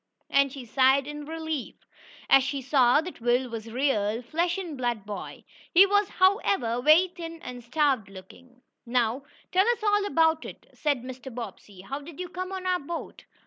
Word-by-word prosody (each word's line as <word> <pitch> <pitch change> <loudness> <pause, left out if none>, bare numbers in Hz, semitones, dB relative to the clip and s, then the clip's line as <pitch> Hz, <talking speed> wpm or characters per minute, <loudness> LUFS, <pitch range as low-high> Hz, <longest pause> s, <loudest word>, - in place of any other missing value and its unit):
and 275 -1 +3
she 265 -2 -8
sighed 265 +3 +3
in 295 0 -7
relief, 315 -3 -4 0.5
as 270 - +6
she 275 +1 -2
saw 260 0 +4
that 350 -6 -9
Will 245 +2 +2
was 225 -1 -6
a - - -9
real, 235 -3 0
flesh 340 +8 -1
and 350 -6 -5
blood 240 -5 -2
boy. 205 -1 -7 0.3
He 375 +3 +9
was, 405 0 +2
however, 370 - +2
very 315 +7 +5
thin 335 -2 -8
and 245 -1 -8
starved 260 -5 +1
looking. 245 +7 -15 0.2
"Now 240 +1 0 0.3
tell 380 +3 +3
us 475 -2 +1
all 415 -1 +2
about 320 -3 +2
it," - - -10
said 285 -5 -1
Mr. 260 +1 -8
Bobbsey. 220 -5 -9
"How 270 +9 -5
did 300 +1 -12
you 360 -1 -5
come 370 +1 -5
on 380 -1 -5
our 365 -1 +1
boat?" 335 +3 -7
275 Hz, 185 wpm, -27 LUFS, 245-340 Hz, 0.5 s, He